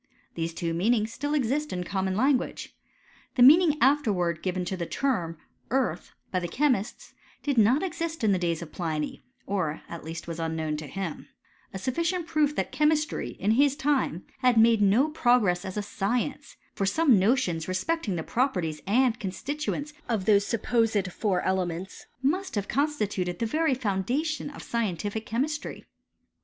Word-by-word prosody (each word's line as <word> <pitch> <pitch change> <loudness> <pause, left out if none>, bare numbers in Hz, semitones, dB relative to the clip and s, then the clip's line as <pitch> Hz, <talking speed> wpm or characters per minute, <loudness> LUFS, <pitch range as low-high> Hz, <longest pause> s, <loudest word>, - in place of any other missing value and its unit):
Thess 165 0 -2
two 165 0 -3
meanings 220 +5 +1
still 290 +2 -2
exist 290 +3 0
in 180 -1 -2
common 190 0 -1
language. 260 +4 0 0.6
The 245 - +5
meaning 305 +3 +7
afterwards 205 - +2
given 185 -1 -2
to 190 - -2
the 170 -2 -4
term, 180 - -1 0.3
earth, 260 +1 -1 0.2
by 185 - +1
the 175 - -3
chemists, 245 - -1 0.3
did 285 -2 0
not 240 - +4
exist 330 -4 -3
in 215 - +4
the 190 - +2
days 170 -1 -1
of 155 - -11
Pliny, 155 -3 -3 0.2
or, 180 -6 -2
at 170 - -8
least, 165 +2 -7
was 165 0 -5
unknown 160 -1 -2
to 155 -1 -7
him; 180 +2 -5 0.4
a - - -5
sufficient 330 - -1
proof 300 -2 +1
tiiat - - -2
chemistry, 305 0 +1
in 205 +3 +2
his 280 +4 +4
time, 280 - 0
had 250 -3 +3
made 225 -1 +5
no 210 +8 +4
progress 240 - +2
as 190 0 -6
a 210 - -1
science; 240 +8 -2 0.2
for 195 - -1
some 270 - +4
notions 190 -6 +1
respecting 200 - -1
the 160 - -3
properties 180 - -1
and 240 +2 +3
constituents 290 +8 -4 0.2
of 215 -5 0
those 200 -1 +4
supposed 225 -4 +1
four 190 -3 0
elements 185 -1 -2 0.2
must 365 +4 0
have 205 -1 -1
constituted 210 - -1
the 230 - -1
very 310 +3 +1
foundation 250 - -1
of 290 - -10
scientific 215 -1 -2
chemistry. 285 +7 -3
220 Hz, 160 wpm, -27 LUFS, 180-280 Hz, 0.6 s, meaning